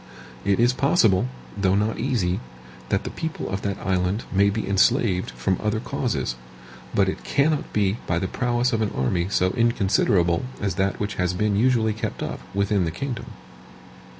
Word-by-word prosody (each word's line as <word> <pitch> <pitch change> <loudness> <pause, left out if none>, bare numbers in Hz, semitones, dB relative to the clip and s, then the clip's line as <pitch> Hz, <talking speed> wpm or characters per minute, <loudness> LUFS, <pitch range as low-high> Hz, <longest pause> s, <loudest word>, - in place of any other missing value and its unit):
It 100 +1 +2
is 120 +1 +4
possible, 115 - +3 0.3
though 95 -1 +2
not 105 +2 0
easy, 110 -8 0 0.5
that - - +1
the - - -5
people 160 -1 -4
of 95 +1 -2
that 100 -1 -2
island 95 +3 0
may 100 +1 +4
be 110 +2 -2
enslaved 100 -1 +2
from 95 -2 -1
other 105 +1 0
causes; 120 - -2 0.6
but 100 -1 +2
it 95 - -3
cannot 150 +1 +1
be 100 0 +1
by 85 - +1
the 95 +2 -1
prowess 120 +3 0
of 110 - +1
an 110 - +1
army 85 +7 0
so 95 -2 +2
inconsiderable 95 -7 +2 0.2
as 100 -1 -1
that 100 0 0
which 105 0 -3
has 90 0 0
been 105 +1 +1
usually 110 -1 +3
kept 110 0 -4
up - - -4
within 100 0 +1
the - - 0
kingdom. 120 - -5
100 Hz, 175 wpm, -24 LUFS, 95-115 Hz, 0.6 s, is